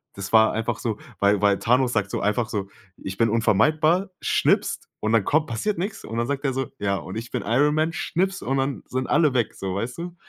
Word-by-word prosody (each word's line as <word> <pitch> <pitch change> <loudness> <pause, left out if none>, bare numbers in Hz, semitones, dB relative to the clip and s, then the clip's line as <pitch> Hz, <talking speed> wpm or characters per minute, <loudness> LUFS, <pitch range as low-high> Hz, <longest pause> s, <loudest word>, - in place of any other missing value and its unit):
das 100 +2 -7
war 110 0 +6
einfach 115 +1 -2
so, 110 -3 -2 0.2
weil 100 0 +3
weil 100 -1 +3
Thanos 125 +1 +2
sagt 105 -3 0
so - - -2
einfach 105 +3 0
so: 100 -2 -3 0.3
„Ich 95 0 -7
bin 115 0 +3
unvermeidbar", 155 - +2
schnipst - - +1
und 110 +1 0
dann 110 -3 +4
kommt 155 +1 +2
passiert 165 - -2
nichts. 195 +4 -4
Und 115 - -5
dann 115 - +1
sagt 140 0 -2
er 135 - +2
so: 135 0 -3
„Ja 100 -1 0
und 95 +4 -7
ich 115 +1 -6
bin - - -2
Iron 145 +7 +2
Man", 160 +2 +1
schnipst 190 +3 -1
und 135 - 0
dann 135 0 -1
sind 130 0 -2
alle 150 -5 +3
weg 120 -4 +1
so, 95 -1 -4
weißt 115 +5 -3
du? 175 0 -6
120 Hz, 235 wpm, -24 LUFS, 105-150 Hz, 0.3 s, war